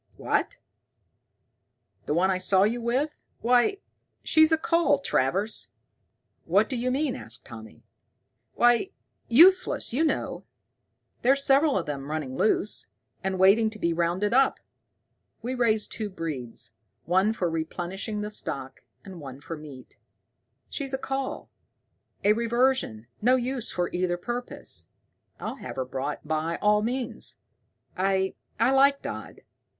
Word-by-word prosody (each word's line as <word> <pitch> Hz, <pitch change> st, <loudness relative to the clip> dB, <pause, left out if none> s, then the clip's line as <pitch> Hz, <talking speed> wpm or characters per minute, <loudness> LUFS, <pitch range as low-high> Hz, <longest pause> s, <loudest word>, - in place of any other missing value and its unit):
"What, -, -, -1 dB, 1.5 s
the 150 Hz, -, 0 dB
one 190 Hz, +3 st, +3 dB
I 185 Hz, -, 0 dB
saw 190 Hz, +1 st, +4 dB
you 235 Hz, +4 st, +1 dB
with? 255 Hz, +6 st, 0 dB, 0.3 s
Why, 245 Hz, -, +3 dB, 0.5 s
she's 315 Hz, 0 st, +5 dB
a 320 Hz, -, +5 dB
cull, 335 Hz, -2 st, +3 dB
Travers." 195 Hz, -, 0 dB, 0.7 s
"What -, -, +3 dB
d'you 255 Hz, -1 st, -1 dB
mean?" 275 Hz, +1 st, 0 dB
asked -, -, -9 dB
Tommy. 110 Hz, -8 st, -11 dB, 0.7 s
"Why 240 Hz, +9 st, +4 dB, 0.4 s
useless, 345 Hz, +3 st, +5 dB
you 290 Hz, +6 st, +2 dB
know. 315 Hz, -, -1 dB, 0.8 s
There's 275 Hz, +3 st, +4 dB
several 275 Hz, 0 st, +4 dB
of 180 Hz, -, -2 dB
them 140 Hz, -1 st, -5 dB
running 150 Hz, -4 st, -3 dB
loose, 210 Hz, +3 st, +1 dB, 0.4 s
and 190 Hz, 0 st, -1 dB
waiting 200 Hz, +4 st, +5 dB
to 215 Hz, -, -8 dB
be 170 Hz, -4 st, 0 dB
rounded 175 Hz, +5 st, 0 dB
up. 265 Hz, +1 st, +4 dB, 0.8 s
We 250 Hz, +2 st, -2 dB
raise 225 Hz, -4 st, +2 dB
two 215 Hz, -2 st, -5 dB
breeds, 125 Hz, -, -5 dB, 0.3 s
one 190 Hz, +5 st, +3 dB
for 190 Hz, -5 st, -1 dB
replenishing 175 Hz, +6 st, -3 dB
the 210 Hz, 0 st, -4 dB
stock, 135 Hz, -9 st, -4 dB, 0.2 s
and 185 Hz, -4 st, -9 dB
one 135 Hz, -2 st, -8 dB
for 165 Hz, +3 st, -6 dB
meat. 145 Hz, -4 st, -12 dB, 0.7 s
She's 275 Hz, -2 st, -5 dB
just 265 Hz, -, -1 dB
a -, -, -7 dB
cull, 270 Hz, 0 st, -3 dB, 0.7 s
a 210 Hz, -, +5 dB
reversion, 235 Hz, -, +1 dB, 0.2 s
no 250 Hz, +4 st, +5 dB
use 255 Hz, -1 st, -1 dB
for 175 Hz, -1 st, -1 dB
either 175 Hz, 0 st, 0 dB
purpose. 240 Hz, +7 st, -4 dB, 0.5 s
I'll -, -, -5 dB
have -, -, -7 dB
her 130 Hz, -, -2 dB
brought 135 Hz, +4 st, -4 dB
by 160 Hz, +2 st, -1 dB
all 210 Hz, 0 st, +3 dB
means. 245 Hz, +2 st, -3 dB, 0.6 s
I 190 Hz, 0 st, +1 dB, 0.3 s
I 230 Hz, +3 st, +4 dB
like 275 Hz, +1 st, +4 dB
Dodd. -, -, -7 dB
210 Hz, 135 wpm, -27 LUFS, 170-255 Hz, 1.5 s, she's